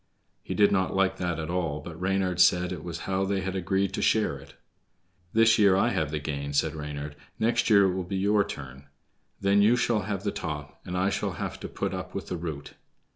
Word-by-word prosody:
He -, -, -5 dB
did 105 Hz, -1 st, +5 dB
not 95 Hz, -2 st, +1 dB
like 95 Hz, 0 st, +2 dB
that 90 Hz, -2 st, -2 dB
at 80 Hz, +1 st, -4 dB
all, 85 Hz, -5 st, -1 dB
but 80 Hz, +2 st, -9 dB
Reynard 95 Hz, -1 st, +1 dB
said 90 Hz, 0 st, +4 dB
it 85 Hz, -4 st, -5 dB
was 85 Hz, -1 st, -6 dB
how 95 Hz, 0 st, -1 dB
they 95 Hz, 0 st, 0 dB
had 95 Hz, +1 st, -3 dB
agreed 95 Hz, +1 st, 0 dB
to -, -, -2 dB
share 110 Hz, -9 st, +2 dB
it. 70 Hz, -, -15 dB, 0.8 s
"This 115 Hz, 0 st, +5 dB
year 100 Hz, -3 st, +6 dB
I 100 Hz, +5 st, +3 dB
have 80 Hz, -10 st, -1 dB
the 75 Hz, -, -2 dB
gain," 70 Hz, -1 st, -4 dB
said 70 Hz, -, +1 dB
Reynard; 75 Hz, -1 st, -6 dB, 0.2 s
"next 115 Hz, +2 st, +1 dB
year 100 Hz, -2 st, +7 dB
it 95 Hz, -2 st, +2 dB
will 95 Hz, 0 st, -2 dB
be 95 Hz, +2 st, -4 dB
your 100 Hz, +2 st, +3 dB
turn. 70 Hz, -8 st, -9 dB, 0.5 s
Then 100 Hz, +1 st, +4 dB
you 110 Hz, +4 st, +5 dB
shall 120 Hz, -2 st, +1 dB
have 100 Hz, -1 st, -4 dB
the 100 Hz, -, 0 dB
top, 75 Hz, -3 st, -6 dB
and 90 Hz, 0 st, -3 dB
I 95 Hz, +2 st, +1 dB
shall -, -, -2 dB
have -, -, -5 dB
to -, -, -6 dB
put -, -, -3 dB
up -, -, -6 dB
with -, -, -5 dB
the 90 Hz, -, -2 dB
root." 80 Hz, -4 st, -6 dB
95 Hz, 230 wpm, -27 LUFS, 80-100 Hz, 0.8 s, year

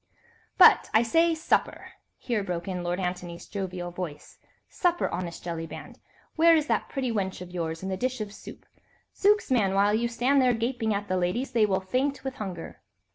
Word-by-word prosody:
"But, -, -, +7 dB
I 220 Hz, -, +6 dB
say, 330 Hz, +8 st, +3 dB
supper!" 315 Hz, -, -1 dB, 0.3 s
here 230 Hz, -5 st, -2 dB
broke 175 Hz, -2 st, -4 dB
in 180 Hz, -2 st, -3 dB
Lord 175 Hz, +1 st, -2 dB
Antony's 180 Hz, -2 st, -4 dB
jovial 185 Hz, -3 st, -5 dB
voice, 170 Hz, -5 st, -7 dB, 0.3 s
"supper, 350 Hz, -1 st, 0 dB
honest 175 Hz, -1 st, -5 dB
Jellyband. 165 Hz, -1 st, -7 dB, 0.4 s
Where 330 Hz, +1 st, +6 dB
is 310 Hz, -2 st, +2 dB
that -, -, -1 dB
pretty 260 Hz, -3 st, -2 dB
wench 195 Hz, -4 st, -2 dB
of 180 Hz, -1 st, -9 dB
yours 165 Hz, -1 st, -4 dB
and 190 Hz, -, -3 dB
the 190 Hz, -, -2 dB
dish 255 Hz, +3 st, -2 dB
of 210 Hz, -1 st, -5 dB
soup? -, -, -12 dB, 0.5 s
Zooks, 415 Hz, -5 st, +2 dB
man, 200 Hz, -6 st, +2 dB
while 200 Hz, +1 st, +3 dB
you 235 Hz, +2 st, +1 dB
stand 250 Hz, +4 st, +2 dB
there 250 Hz, -2 st, +3 dB
gaping 230 Hz, -1 st, -1 dB
at 205 Hz, 0 st, -2 dB
the 185 Hz, -, 0 dB
ladies, 185 Hz, +10 st, -1 dB
they 225 Hz, -4 st, +3 dB
will 190 Hz, -2 st, 0 dB
faint 260 Hz, +9 st, -1 dB
with 265 Hz, 0 st, -5 dB
hunger." 185 Hz, -6 st, -7 dB
205 Hz, 185 wpm, -27 LUFS, 180-255 Hz, 0.5 s, But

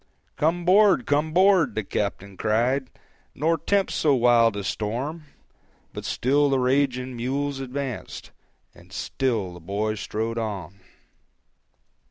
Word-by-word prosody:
"Come 170 Hz, +3 st, 0 dB
'board, 190 Hz, -, +5 dB
come 150 Hz, +2 st, +1 dB
'board," 180 Hz, -, +4 dB
the 110 Hz, -, -1 dB
captain 100 Hz, 0 st, -3 dB
cried, 120 Hz, +6 st, 0 dB, 0.5 s
"Nor 160 Hz, +3 st, +1 dB
tempt 200 Hz, +3 st, +1 dB
so 145 Hz, -3 st, +2 dB
wild 115 Hz, -3 st, +4 dB
a 100 Hz, -, -3 dB
storm;" 125 Hz, -, -3 dB, 0.7 s
But -, -, -7 dB
still 140 Hz, +3 st, +2 dB
the 135 Hz, -, +2 dB
raging 130 Hz, -1 st, 0 dB
mules 135 Hz, +3 st, -2 dB
advanced, 135 Hz, -2 st, -6 dB, 0.4 s
And -, -, -18 dB
still 115 Hz, -9 st, -2 dB
the 85 Hz, -, -11 dB
boy 100 Hz, +5 st, -2 dB
strode 110 Hz, +2 st, -3 dB
on. 100 Hz, -4 st, -5 dB
125 Hz, 125 wpm, -24 LUFS, 110-145 Hz, 0.7 s, board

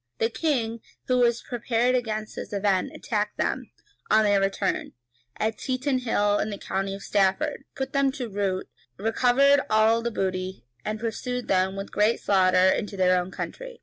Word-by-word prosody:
The 225 Hz, +1 st, 0 dB
king, 230 Hz, -3 st, -1 dB, 0.2 s
who 255 Hz, -1 st, +2 dB
was 235 Hz, -1 st, +2 dB
prepared 240 Hz, 0 st, 0 dB
against 220 Hz, -4 st, -2 dB
this -, -, -6 dB
event, 195 Hz, -2 st, +1 dB
attacked -, -, -2 dB
them, -, -, -1 dB, 0.4 s
on 220 Hz, -, +5 dB
their 205 Hz, -1 st, +3 dB
return, 195 Hz, 0 st, -1 dB, 0.4 s
at 220 Hz, +1 st, -1 dB
Tetenhall 255 Hz, -6 st, 0 dB
in 215 Hz, -, -1 dB
the 200 Hz, -, -5 dB
county 195 Hz, 0 st, -3 dB
of 195 Hz, -, -10 dB
Stafford, 195 Hz, +6 st, +1 dB
put 265 Hz, +3 st, -4 dB
them 275 Hz, -1 st, +3 dB
to 260 Hz, -4 st, -4 dB
rout, 195 Hz, -3 st, -2 dB, 0.3 s
recovered 250 Hz, +6 st, +4 dB
all 220 Hz, +1 st, +4 dB
the 235 Hz, -, -1 dB
booty, 185 Hz, -, -3 dB, 0.2 s
and 215 Hz, 0 st, -3 dB
pursued 240 Hz, +2 st, -3 dB
them 190 Hz, 0 st, +2 dB
with 195 Hz, 0 st, -6 dB
great 210 Hz, +3 st, +2 dB
slaughter 185 Hz, -1 st, +4 dB
into 205 Hz, 0 st, -1 dB
their 185 Hz, -1 st, +4 dB
own 180 Hz, -, -7 dB
country. -, -, -7 dB
215 Hz, 165 wpm, -26 LUFS, 195-245 Hz, 0.4 s, on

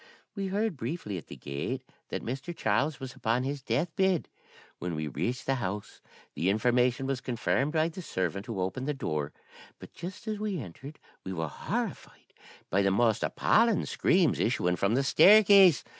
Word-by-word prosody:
We 195 Hz, -2 st, -3 dB
heard 200 Hz, -2 st, -1 dB
briefly 115 Hz, -, -4 dB
at 80 Hz, -, -15 dB
the -, -, -9 dB
gate 70 Hz, 0 st, -4 dB, 0.3 s
that -, -, -4 dB
Mr. 135 Hz, +8 st, -5 dB
Charles 135 Hz, +8 st, +1 dB
was 130 Hz, -2 st, -7 dB
upon 120 Hz, +2 st, 0 dB
his 140 Hz, +1 st, -3 dB
death 160 Hz, +5 st, -1 dB
bed. 190 Hz, -4 st, +1 dB, 0.5 s
When 90 Hz, -2 st, -3 dB
we 75 Hz, 0 st, -3 dB
reached 90 Hz, -, -3 dB
the 135 Hz, -, +1 dB
house, 100 Hz, +1 st, -5 dB, 0.3 s
the 90 Hz, -, 0 dB
information 125 Hz, +4 st, +2 dB
was 135 Hz, -2 st, -2 dB
confirmed 130 Hz, +4 st, 0 dB
by 160 Hz, 0 st, +2 dB
the 175 Hz, +3 st, -8 dB
servant 95 Hz, -, -3 dB
who 115 Hz, -5 st, -4 dB
opened 95 Hz, +9 st, -2 dB
the 150 Hz, -, -1 dB
door. 75 Hz, -, -2 dB, 0.5 s
But -, -, -13 dB
just 185 Hz, +6 st, -8 dB
as 215 Hz, -1 st, -2 dB
we 210 Hz, -4 st, -2 dB
entered 135 Hz, -, -9 dB, 0.3 s
we 95 Hz, -, -5 dB
were 80 Hz, -3 st, -3 dB
horrified -, -, -5 dB, 0.4 s
by 100 Hz, -, +3 dB
the 100 Hz, -, +3 dB
most 110 Hz, +2 st, +2 dB
appalling 230 Hz, -2 st, +2 dB
screams 175 Hz, -4 st, +2 dB
issuing 90 Hz, -6 st, +1 dB
from 100 Hz, +5 st, +1 dB
the 135 Hz, -, +2 dB
staircase. 195 Hz, +1 st, +7 dB
125 Hz, 175 wpm, -29 LUFS, -, 0.5 s, staircase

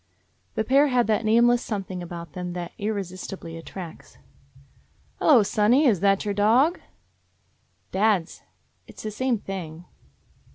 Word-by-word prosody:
The 220 Hz, -, 0 dB
pair 275 Hz, +5 st, +4 dB
had 250 Hz, -3 st, +2 dB
that 220 Hz, +1 st, +1 dB
nameless 235 Hz, +2 st, +4 dB
something 195 Hz, -4 st, -4 dB
about 170 Hz, -1 st, -8 dB
them 180 Hz, -1 st, -5 dB
that 175 Hz, -1 st, -6 dB
irresisti 195 Hz, -2 st, -4 dB
bly 165 Hz, -, -9 dB
attracts. 165 Hz, +1 st, -10 dB, 1.0 s
"Hello, 255 Hz, -8 st, +6 dB
sonny. 235 Hz, +7 st, +3 dB
That 195 Hz, +1 st, +1 dB
your 205 Hz, -, -1 dB
dog?" 235 Hz, -, +3 dB, 1.1 s
"Dad's. 195 Hz, -3 st, +1 dB, 0.5 s
It -, -, -15 dB
's -, -, -9 dB
the 215 Hz, -, -4 dB
same 255 Hz, +2 st, 0 dB
thing." 175 Hz, -4 st, -7 dB
205 Hz, 130 wpm, -25 LUFS, 180-235 Hz, 1.1 s, Hello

